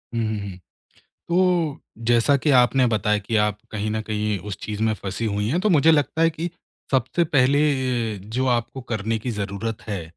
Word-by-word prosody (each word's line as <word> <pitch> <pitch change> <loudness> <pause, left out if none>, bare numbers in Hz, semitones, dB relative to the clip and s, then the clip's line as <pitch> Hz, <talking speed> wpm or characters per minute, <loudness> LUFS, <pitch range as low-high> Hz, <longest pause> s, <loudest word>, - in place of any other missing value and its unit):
हुँ, 115 - 0
हुँ, 110 - -2
हुँ। 100 -2 -7 0.7
तो 175 -4 +2 0.3
जैसा 120 +4 +4
कि 150 +3 0
आपने 125 0 +4
बताया 105 -2 +1
कि 110 +2 -2
आप 105 -1 +1
कहीं 105 0 -3
न 110 0 -1
कहीं 105 -1 -2
उस 100 - -4
चीज़ 105 0 -4
में 110 0 +2
फँसी 100 +3 -5
हुई 105 0 -1
हैं 170 +8 +1
तो 215 - +1
मुझे 160 -2 +5
लगता 155 +1 +2
है 165 - +5
कि 165 +2 -4 0.4
सबसे 135 +6 +1
पहले 140 -3 +3
ये 125 -6 -1 0.2
जो 130 - +1
आपको 120 +3 -3
करने 110 0 -1
की 120 +3 -4
ज़रूरत 105 +1 -4
है, 100 -5 -3
115 Hz, 195 wpm, -23 LUFS, 105-140 Hz, 0.7 s, मुझे